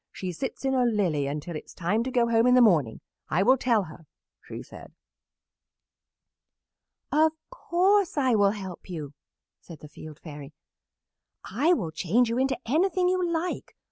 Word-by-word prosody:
She 185 -1 -5
sits 265 +7 -6
in 265 - +1
a 255 -1 +2
lily 185 - 0
until 150 +4 -5
it 155 - -7
is - - -16
time 195 +6 0
to - - -2
go 245 -2 +2
home 230 +1 +3
in 250 - +5
the - - +6
morning. 160 - +3 0.3
I 175 +5 +2
will 255 +5 +5
tell 235 -5 +1
her,' 160 -2 -13 0.3
she - - -9
said." - - -13 2.2
"'Of 315 +1 +3 0.2
course 390 -5 +1
I 260 -3 +2
will 205 -2 +4
help 190 -2 -9
you," 150 -5 -6 0.5
said 165 -4 -13
the 150 - -10
Field 155 0 -12
Fairy. 145 -2 -10 0.9
"I 285 - +1
will 180 - -2
change 195 +10 +1
you 235 +2 -1
into 265 0 +1
anything 360 - +1
you 370 0 0
like. 340 0 -3
225 Hz, 170 wpm, -26 LUFS, 165-270 Hz, 2.2 s, the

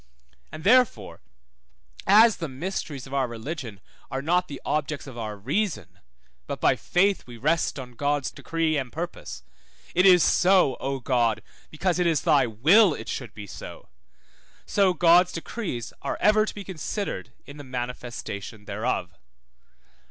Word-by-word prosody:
And 155 - -9
therefore, 250 +5 +3 0.9
as 215 +1 +7
the 165 - -4
mysteries 145 -1 -5
of 135 - -11
our 135 -2 +1
religion 120 - -6 0.3
are 135 +1 -4
not 180 +3 +2
the 140 - -7
objects 150 -1 -2
of 135 -3 -10
our 110 -3 -5
reason, 105 - -2 0.5
but - - -4
by - - +3
faith 195 -1 +1
we 120 -1 -10
rest 155 +8 0
on 130 -2 -7
God's 145 +2 -1
decree 165 -2 -1
and 130 -3 -3
purpose 170 +5 -6 0.5
(it 180 +2 +5
is 180 -3 +7
so, 180 -7 +4
O 135 0 -2
God, 120 -4 +1 0.3
because 180 +3 -1
it 175 - +2
is 160 -3 +1
thy 140 -4 +4
will 160 - +5
it - - -8
should 125 -5 -5
be 105 - -8
so) 95 - -10 0.8
so 195 -3 +2
God's 175 +2 +5
decrees 165 - -5
are - - -3
ever 215 +1 +4
to - - -5
be 205 - -6
considered 180 - -5
in 140 - -11
the 145 - -9
manifestation 120 -5 -6
thereof. 100 -3 -2
145 Hz, 150 wpm, -25 LUFS, 120-180 Hz, 0.9 s, as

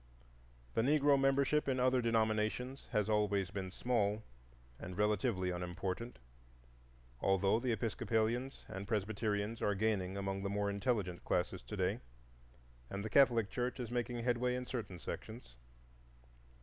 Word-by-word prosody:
The - - +2
Negro 145 +2 +4
membership 140 +2 +3
in 130 -1 +1
other 130 0 +3
denominations 115 +3 0
has 105 -4 +1
always 105 -3 +1
been 95 -2 -4
small 105 0 0 0.6
and 90 0 -7
relatively 105 -2 +1
unimportant, 90 +6 -4 1.0
although 95 +3 +3
the 125 0 0
Episcopalians 115 +3 -1
and 95 +1 -6
Presbyterians 105 0 -1
are 105 - +2
gaining 100 -2 0
among 100 0 -2
the 100 - -2
more 100 0 0
intelligent 100 -4 -1
classes - - 0
to - - -7
day, - - +1 0.9
and 100 +1 -4
the 110 - -4
Catholic 120 -6 +5
Church 125 +1 -2
is 120 -2 -4
making 120 -1 -2
headway 125 +1 +1
in 125 0 -3
certain 115 -8 -4
sections. 110 - -7
110 Hz, 135 wpm, -36 LUFS, 100-125 Hz, 1.0 s, Catholic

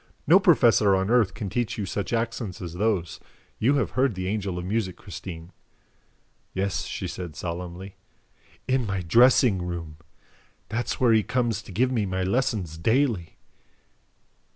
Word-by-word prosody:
No 175 +6 +7
professor 120 - +5
on 95 +3 0
earth 115 -6 +3
can 105 -2 -4
teach 115 +4 -2
you 105 - -2
such 100 +1 -3
accents 115 -4 -2
as 85 -2 -6
those. 90 -3 -1 0.4
You 130 +6 +3
have 140 - 0
heard 130 -4 +1
the 90 0 -4
Angel 100 -2 -2
of 90 - -4
Music, 95 -3 -2
Christine." 85 -1 -9 1.0
"Yes," 95 0 -1
she - - -4
said 85 -5 -7
solemnly, 90 +3 -6 0.7
"IN 130 -3 +1
MY 95 -2 -2
DRESSING 115 - +5
ROOM. 85 -3 -5 0.7
That 120 +4 -2
is - - 0
where 120 -3 +3
he 110 - +5
comes 115 -2 -1
to 105 - -12
give 125 +7 +1
me 110 -5 0
my 95 0 -2
lessons 95 - -1
daily." 115 - 0
100 Hz, 155 wpm, -25 LUFS, 90-120 Hz, 1.0 s, No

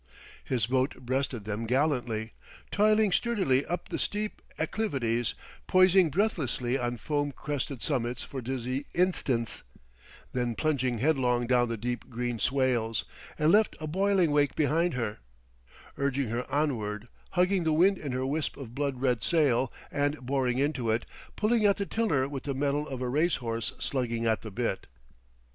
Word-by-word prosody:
His 120 -5 0
boat 130 +3 +1
breasted 130 -3 -2
them 110 +2 -3
gallantly, 120 -4 0 0.4
toiling 215 0 +4
sturdily 185 - +2
up 175 - -3
the - - -3
steep 210 +1 -2 0.2
acclivities, 130 - -1 0.3
poising 185 -2 +5
breathlessly 140 - 0
on 120 -2 -1
foam 145 +3 -1
crested 140 -3 -4
summits 125 -4 -1
for 135 - -6
dizzy 130 +2 -3
instants, 135 - +1 0.7
then 120 -2 -1
plunging 130 -5 0
headlong 125 -2 +2
down 120 -1 +3
the 115 - -2
deep 120 +1 -4
green 120 -1 -3
swales; 125 -4 +1 0.3
and 155 +1 +3
left 215 +2 +4
a 155 - -4
boiling 190 0 +2
wake 145 -1 +2
behind 160 +2 +2
her, 115 -4 -2 0.8
urging 140 -3 0
ever 120 +2 -2
onward, 115 -7 -1 0.3
hugging 180 0 +3
the 160 - +2
wind 185 +5 +4
in 145 - -4
her 130 +1 -1
wisp 150 +3 -2
of 125 -5 -8
blood 140 -2 -2
red 125 -4 +2
sail, 135 -7 +2 0.2
and 145 +1 0
boring 130 -2 +1
into 135 -4 0
it, 110 +2 +1 0.3
pulling 220 +1 +2
at 200 -1 +4
the 200 - -1
tiller 185 -13 +1
with 140 -2 -5
the 140 -2 -2
mettle 145 +2 0
of 130 -2 -4
a - - -1
race 155 +7 +2
horse 115 -2 -3
slugging 120 -3 -1
at 110 -4 +2
the 110 - -7
bit. 110 -1 -2
135 Hz, 155 wpm, -29 LUFS, 120-155 Hz, 0.8 s, poising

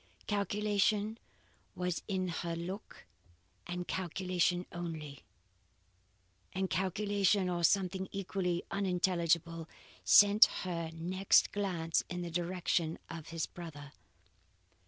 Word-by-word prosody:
Calculation 210 +1 +1 0.6
was 180 -1 -2
in 185 -3 -1
her 170 0 -3
look 180 +5 -7 0.6
and 180 0 -4
calculation 180 -1 0
only; 160 -5 -6 1.3
and 190 +1 -1
calculation, 195 +2 +1
or 175 -1 -1
something 190 +1 +2
equally 185 -2 -2
unintelligible, 170 -3 0 0.3
sent 205 +1 +8 0.2
her 170 -3 -3
next 180 +4 +3
glance 175 -5 0
in 180 0 -3
the 170 - -5
direction 175 -1 0
of 160 -2 -7
his 165 -1 -2
brother. 145 -5 -9
180 Hz, 95 wpm, -33 LUFS, 170-195 Hz, 1.3 s, sent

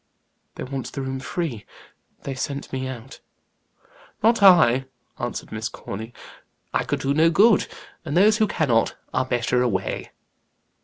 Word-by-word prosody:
"They - - -6
want 135 -1 -5
the 135 - -5
room 130 0 -4
free; 130 - -4 0.6
they 140 - -4
sent 140 +2 -5
me 130 0 -2
out." 130 +1 -9 1.0
"Not 230 0 +4
I," 160 -10 +6 0.3
answered 120 -1 -5
Miss 110 +2 -3
Corny. 110 +4 -7 0.6
"I - - +1
could - - -2
do 135 +1 +1
no 160 +3 +4
good; 210 +5 +4 0.4
and 160 0 -2
those 210 +3 +5
who 215 -1 +3
cannot, 125 - +1 0.2
are 130 - +1
better 125 0 0
away." 100 -6 -2
135 Hz, 145 wpm, -23 LUFS, 120-165 Hz, 1.0 s, I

